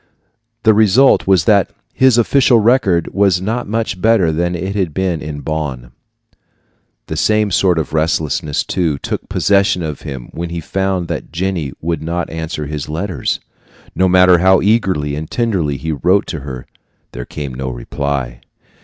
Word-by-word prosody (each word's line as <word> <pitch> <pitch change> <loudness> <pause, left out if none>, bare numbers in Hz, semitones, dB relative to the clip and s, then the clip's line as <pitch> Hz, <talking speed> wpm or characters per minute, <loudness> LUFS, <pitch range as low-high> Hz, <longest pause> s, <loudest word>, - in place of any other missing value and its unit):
The 110 - +5
result 110 +5 +4
was 95 -5 +3
that 100 -3 +3 0.2
his 130 -2 +4
official 125 +1 +4
record 110 -7 +2
was 100 -2 +3
not 110 +6 -3
much 110 -4 -2
better 110 -7 +3
than 85 +3 -1
it 95 +3 -3
had 90 -7 -1
been 95 -4 -1
at 75 -2 -7
Bonn. 70 -6 -4 1.1
The 80 - -5
same 105 +6 +1
sort 95 -2 +2
of 80 - -3
restlessness, 80 -2 0
too, 80 -6 -1
took - - -5
possession 100 -3 +2
of 75 -3 -5
him 65 -4 -7
when 85 +1 -5
he 85 0 -4
found 95 +1 -2
that - - -5
Jenny 85 -5 -2
would 80 -2 -2
not 85 +2 -3
answer 80 -2 -4
his 75 0 -5
letters. 85 -2 -2 0.5
No 95 - +2
matter 90 -1 +5
how 95 +1 +5
eagerly 95 -9 +1
and 75 +1 -6
tenderly 95 - -1
he 80 +3 -4
wrote 90 +6 +2
to 80 - -4
her, 65 -2 -8 0.5
there - - -7
came 70 -4 -6
no 65 +1 -4
reply. 65 0 -4
85 Hz, 160 wpm, -16 LUFS, 75-100 Hz, 1.1 s, The